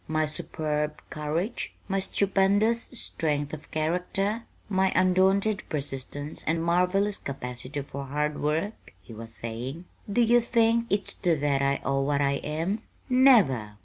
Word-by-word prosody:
My 155 0 +1
superb 150 0 -3
courage? 160 +9 -3
My 195 0 0
stupendous 200 +4 +2
strength 150 - -2
of 155 - -8
character? 180 +7 -1 0.2
My 190 -1 +2
undaunted 190 +3 +3
persistence 145 0 -4
and 165 +1 +1
marvelous 180 +4 +2
capacity 130 +1 -5
for 140 0 -6
hard 150 +2 -2
work?" 160 +8 -2
he 115 - -13
was 115 +1 -8
saying. 120 +9 -6 0.3
"Do 240 - +3
you 240 +1 +5
think 230 0 +2
it's 200 0 0
to 170 -3 +1
that 140 -2 +2
I 140 0 +1
owe 135 0 +1
what 140 +1 +1
I 140 -1 +2
am? 165 +10 -2 0.3
Never! 195 - +5
160 Hz, 140 wpm, -27 LUFS, 145-200 Hz, 0.3 s, you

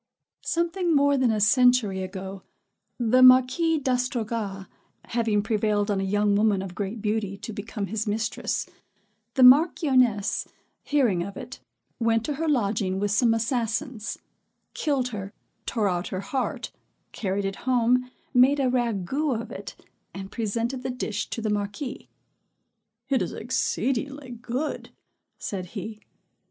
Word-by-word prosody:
Something 340 0 0
more 285 0 +4
than 260 -3 +2
a 220 -1 +1
century 225 -3 +4
ago, 190 +1 -6 0.6
the 245 +1 +3
Marquis 255 +6 +6
D'Astrogas 230 -7 -2 0.4
having 225 -3 0
prevailed 210 -1 +1
on 195 -1 0
a - - -1
young 205 +1 +2
woman 205 -2 +2
of 185 -2 -7
great 205 +3 -4
beauty 210 -2 -1
to 215 +2 -7
become 205 0 -4
his 220 +2 -3
mistress, 215 +2 -1 0.7
the 260 - +5
Marchioness 255 - +4 0.3
hearing 245 -12 +2
of 195 +3 -6
it, - - -8 0.4
went 225 -1 +2
to 300 - -1
her 325 - +1
lodging 200 -7 0
with 205 0 0
some 230 +3 +3
assassins, 230 0 -2 0.6
killed 275 -5 0
her, 200 -3 -6 0.3
tore 220 -4 +1
out 180 -1 -1
her 185 - -4
heart, 255 +6 -3 0.4
carried 195 -1 -2
it 195 0 -3
home, 250 0 +3 0.2
made 260 +3 +5
a 260 -2 +2
ragout 245 - 0
of 230 - -7
it, - - -8 0.4
and 195 +1 -7
presented 230 +3 -2
the 260 - -3
dish 230 -4 -3
to 230 - -4
the 215 - 0
Marquis. 205 +6 -4 1.0
"It 270 -2 +1
it - - -2
exceedingly 260 +3 -2
good," 245 +5 -4 0.5
said 185 -3 -5
he. 215 +2 -6
225 Hz, 140 wpm, -26 LUFS, 205-255 Hz, 1.0 s, Marquis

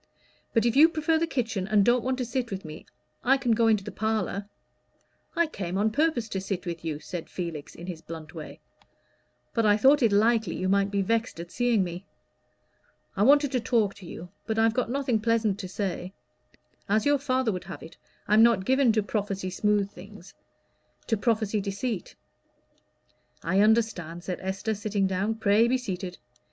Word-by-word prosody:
But 225 -1 +2
if 235 - +2
you 310 +4 +8
prefer 320 0 +1
the 335 - 0
kitchen, 225 - -2
and 210 -2 +3
don't 240 0 +3
want 260 0 -1
to 255 - -2
sit 240 0 -2
with 195 -2 -6
me, 155 0 -10 0.4
I 270 +2 +4
can 255 -3 0
go 225 0 +3
into 215 -3 +3
the - - -7
parlor." 215 -2 -2 0.9
"I 340 - +3
came 190 - -4
on 215 +2 +2
purpose 290 -4 +1
to 190 - -3
sit 195 -1 -4
with 170 -2 -5
you," 155 -3 -3
said 175 +1 -7
Felix, 170 -5 -6
in 170 - -9
his 175 -3 -6
blunt 160 -2 -9
way, 160 -3 -9 0.9
"but 230 - +1
I 210 -1 +4
thought 275 +6 +5
it 230 -3 +4
likely 220 -2 +2
you 185 - -2
might 200 +1 +2
be 200 -1 0
vexed 230 -1 -1
at 170 0 -8
seeing 240 -5 +2
me. 175 +1 -6 1.1
I 195 - -1
wanted 285 +4 +5
to 255 - +1
talk 225 -4 +1
to 185 - -11
you, 175 +1 -9 0.2
but 220 -1 -1
I've 225 0 +3
got 250 -1 -1
nothing 255 -3 0
pleasant 220 -3 +1
to 185 - -5
say. 185 -1 -4 0.8
As 215 +1 +2
your 290 -1 +3
father 260 -4 0
would 180 -2 -5
have - - -8
it, 160 - -12 0.3
I'm 210 +2 +5
not 225 -5 +4
given 265 0 +4
to 215 -1 +1
prophesy 200 -3 -3
smooth 205 +1 +1
things 195 0 -13 0.7
to 225 - +1
prophesy 215 -1 0
deceit." 200 +1 -4 1.3
"I 185 +4 +1
understand," 205 -6 +1
said 180 -1 -4
Esther, 190 +3 -2
sitting 205 -1 -1
down. 190 +4 0
"Pray 220 +1 +3
be 255 +2 +2
seated. 185 -6 -5
210 Hz, 190 wpm, -27 LUFS, 190-235 Hz, 1.3 s, you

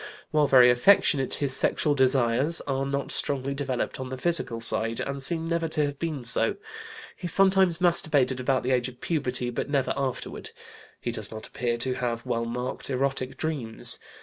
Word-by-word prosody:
While 150 -1 +2
very 125 -2 +6
affectionate, 135 0 +3
his 140 -2 0
sexual 150 +1 +1
desires 130 +3 +2
are 135 -1 -2
not 140 0 -3
strongly 140 -1 -2
developed 135 -3 -3
on 130 -1 -5
the 130 - -6
physical 135 -6 +2
side, 115 0 +1
and 140 0 -4
seem 160 +4 +2
never 165 0 -1
to 155 -1 +2
have 145 -1 -6
been 155 -6 -4
so. - - +2 0.6
He 180 - -6
sometimes 190 -1 +3
masturbated 155 -7 +2
about 130 +1 0
the 130 - -1
age 125 0 +1
of 125 - -16
puberty, 130 -6 -2
but 120 - -4
never 140 -3 0
afterward. 135 -2 -4 0.5
He - - -4
does - - -3
not 110 0 -9
appear 120 -1 -3
to 130 +2 -1
have 120 -1 -3
well 115 -2 -2
marked 125 +3 -4
erotic 135 0 -2
dreams. 140 -9 0
135 Hz, 175 wpm, -26 LUFS, 125-150 Hz, 0.6 s, very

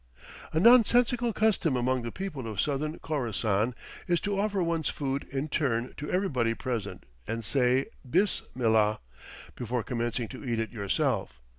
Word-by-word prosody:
A 160 - +1
nonsensical 240 +2 +5
custom 200 - +2
among 130 +1 +1
the 115 0 -5
people 160 -11 -5
of 105 -3 -5
Southern 150 +2 -1
Khorassan 115 -5 -1 0.3
is 175 -1 +2
to 200 -1 -1
offer 200 -2 +1
one's 165 -2 0
food 140 -1 -3
in 140 +2 -2
turn 130 -6 -1
to 150 - -5
everybody 130 -12 +1
present 105 -8 -4 0.2
and 115 -1 -3
say, 130 +1 +2 0.2
"Bis 185 +8 +3 0.2
millah," 110 -3 +3 0.6
before 120 -1 -2
commencing 120 -2 -2
to 130 - -9
eat 120 -4 -1
it 115 - -2
yourself. 100 - -1
130 Hz, 150 wpm, -28 LUFS, 115-170 Hz, 0.6 s, nonsensical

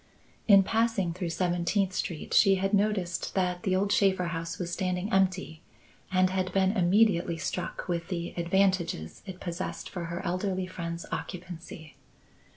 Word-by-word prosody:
In 200 -3 +8
passing 220 -5 +1
through 180 -1 -3
Seventeenth 180 +3 0
Street, 170 -3 -3
she 195 -2 +6
had 195 +2 -1
noticed 200 -4 0
that 180 -2 0
the 185 0 +1
old 200 +2 +1
Shaffer 190 -4 +3
house 165 +1 -4
was 175 -1 -4
standing 185 +1 -2
empty 185 -4 +1 0.5
and 185 0 +3
had 185 -1 -1
been 190 -1 +3
immediately 185 -3 +3
struck 180 +2 -4
with 170 -2 -2
the 170 -2 -4
advantages 175 - 0
it 185 -1 -7
possessed 175 +1 -5
for 175 -3 -4
her 170 +1 -5
elderly 185 +1 -1
friend's 170 -2 -5
occupancy. 170 -5 -7
185 Hz, 150 wpm, -29 LUFS, 170-195 Hz, 0.5 s, In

